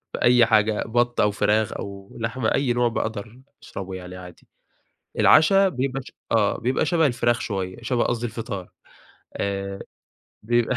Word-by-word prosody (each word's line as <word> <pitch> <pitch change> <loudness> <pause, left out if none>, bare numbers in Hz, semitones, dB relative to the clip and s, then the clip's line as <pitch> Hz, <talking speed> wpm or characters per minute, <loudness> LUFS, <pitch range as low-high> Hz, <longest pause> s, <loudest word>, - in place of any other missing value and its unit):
في - - -4
أي 120 -1 +6
حاجة 110 -1 +2
بط 120 +2 +1
أو 105 - +4
فراخ 105 +1 +1
أو 100 0 -8
لحمة، 115 +1 -1
أي 135 -3 +2
نوع 120 0 +2
باقدر 110 +1 -4 0.2
أشربه 95 -1 -7
يعني 90 0 -8
عادي. 90 -2 -13 0.7
العشا 195 +5 +6
بيبقى 135 -2 -2
ش - - -13 0.2
آه 110 -3 +2
بيبقى 125 +3 0
شبه 165 -3 +2
الفراخ 120 -2 +1
شوية، 95 -4 -3
شبه 120 +1 0
قصدي 120 0 -1
الفطار 110 -5 -5 0.7
آآ 100 0 -3 0.6
بيبقى 120 +2 +1
115 Hz, 150 wpm, -23 LUFS, 100-120 Hz, 0.7 s, أي